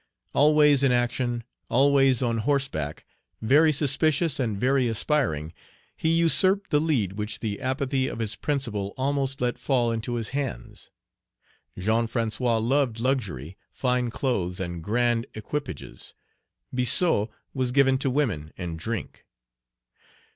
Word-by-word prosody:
Always 150 -1 +5
in 135 -2 +4
action, 120 -1 0 0.3
always 135 0 +4
on 115 -2 0
horseback, 115 - -1 0.3
very 150 +8 +4
suspicious, 150 +2 +1
and 110 -6 -1
very 130 +1 +2
aspiring, 110 - -1 0.4
he 160 - -1
usurped 185 +4 +2
the 150 - +4
lead 125 - 0
which 105 0 -3
the 110 +2 -4
apathy 130 0 -1
of - - -5
his 110 -2 -3
principal 115 -9 -2
almost 135 0 -1
let 120 -1 -1
fall 120 -4 +1
into 115 +2 -3
his 115 -3 -3
hands. 135 - -5 0.9
Jean 110 +5 +1
François 115 0 0
loved 120 0 +1
luxury, 100 - -2
fine 125 -2 0
clothes, 100 -8 -2
and 85 -3 -5
grand 120 +3 +1
equipages; 110 - -6 0.6
Biassou 125 - +2 0.3
was 130 -2 -1
given 135 0 +3
to 135 - 0
women 115 - -1
and 85 -3 -5
drink. 110 +2 -5
125 Hz, 125 wpm, -26 LUFS, 110-140 Hz, 0.9 s, Always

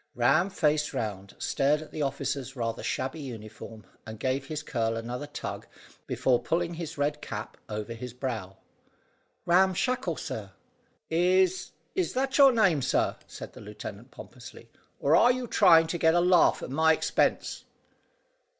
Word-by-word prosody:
Ram 140 +10 +3
faced 150 -5 0
round, 100 -4 -4
stared 145 +2 +1
at 155 - -11
the 155 - -5
officer's 135 -1 -2
rather 115 -2 -3
shabby 130 +5 -3
uniform, 110 -4 -9 0.2
and 110 -1 -9
gave 130 +2 -1
his 150 0 -4
curl 115 -4 -1
another 120 +5 -5
tug 145 - -6 0.4
before 125 -2 +1
pulling 170 +1 -1
his 165 -3 -6
red 145 +1 -1
cap 105 0 -6
over 105 +2 -4
his 125 +2 -7
brow. 110 -7 -5 0.9
"Ram 185 +2 +4
Shackle, 220 - -1
sir." 100 -3 -6 0.6
"Is 185 +2 +2 0.2
is 370 -2 -1
that 265 +2 0
your 275 -1 +9
name, 195 - +3
sir," - - +1
said - - -9
the - - -12
lieutenant 105 +2 -9
pompously, 120 -2 -12 0.3
"or 145 +3 +3
are 245 - +6
you 250 0 -2
trying 175 -8 +6
to 170 +1 -3
get 160 +1 +4
a - - +5
laugh 180 0 +4
at - - -6
my 160 +3 +4
expense?" - - 0
145 Hz, 155 wpm, -28 LUFS, 115-175 Hz, 0.9 s, your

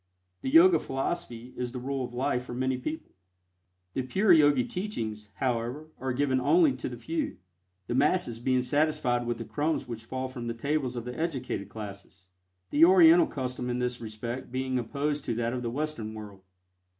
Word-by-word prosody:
The - - -2
Yoga 165 +3 +7
philosophy 135 -4 -4
is 125 -1 -4
the 125 - -4
rule 135 +1 -2
of 120 - -5
life 125 0 -1
for 120 - -6
many 130 +1 0
people. 155 +5 -5 0.8
The - - 0
pure 190 +9 +3
Yogi 145 -5 +5
teachings, 110 - -4
however, 125 +6 -2
are 130 0 -2
given 130 0 +1
only 335 - +5
to - - -4
the - - -7
few, 325 -3 -3 0.5
the 120 - -3
masses 135 -3 +2
being 130 +1 +2
satisfied 125 -3 +1
with 120 -1 -1
the 115 - -6
crumbs 150 +1 -1
which 115 -2 -7
fall 130 +2 -3
from 125 -2 -6
the 115 - -3
tables 140 0 -1
of 120 -1 -4
the 125 0 -5
educated 130 - -3
classes, 100 -3 -9 0.5
the 300 - +5
Oriental 340 -2 +8
custom 125 -3 -4
in 120 - -1
this 125 -1 -2
respect 115 +3 -6
being 130 0 -1
opposed 145 +4 -2
to 115 - -1
that 120 +1 -1
of 125 - -3
the 120 - -2
Western 120 -5 -3
world. 105 -3 -9
130 Hz, 185 wpm, -28 LUFS, 120-150 Hz, 0.8 s, Oriental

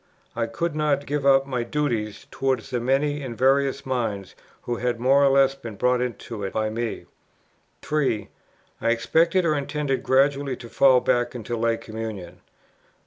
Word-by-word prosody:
I 115 -1 -1
could 150 +8 -3
not 145 -2 0
give 145 -1 -1
up 135 0 +5
my 130 -3 -2
duties 120 -5 -2
towards 135 -1 -1
the 125 - 0
many 140 +4 0
and 120 -4 -6
various 135 +1 +2
minds 115 -7 -3 0.3
who 120 -1 -3
had 120 -1 -1
more 135 +3 +4
or - - +6
less 135 0 +4
been 120 -6 -9
brought 125 +3 +1
into 120 -3 -5
it 95 - -4
by 110 0 -1
me; 115 +1 -4 0.8
3. 135 -9 0 0.5
I 115 - +1
expected 165 +10 +2
or 155 - +3
intended 145 -1 -2
gradually 135 0 +2
to 120 -2 -11
fall 130 -1 +5
back 120 0 0
into 120 0 -4
Lay 115 0 +1
Communion; 110 -6 -7
4. - - -31
130 Hz, 170 wpm, -24 LUFS, 115-140 Hz, 0.8 s, or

